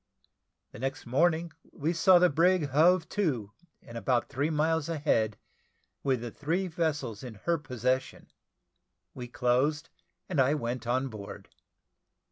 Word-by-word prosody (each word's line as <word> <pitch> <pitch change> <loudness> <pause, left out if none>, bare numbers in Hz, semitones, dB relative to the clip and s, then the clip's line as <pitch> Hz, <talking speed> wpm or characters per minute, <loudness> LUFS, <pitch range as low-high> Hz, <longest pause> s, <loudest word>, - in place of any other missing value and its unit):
The - - -11
next 135 +3 -4
morning 160 +6 +1 0.2
we 155 +4 -2
saw 180 +2 +6
the 180 +1 +5
brig 170 0 +3
hove 165 +5 +4
to 130 - -1 0.3
and 115 0 -8
about 120 +3 0
three 145 +3 -1
miles 160 0 0
a 165 - -2
head, 110 -8 +1 0.6
with 130 -4 0
the 120 -1 -5
three 165 - -1
vessels 155 - -2
in 120 -4 -8
her 170 -1 +1
possession. 130 -2 -2 0.8
We 125 -2 -7
closed, 130 +4 0 0.4
and 165 -7 +1
I 135 +3 +3
went 120 -3 -4
on 130 +2 0
board. 105 -3 -9
145 Hz, 140 wpm, -29 LUFS, 125-165 Hz, 0.8 s, saw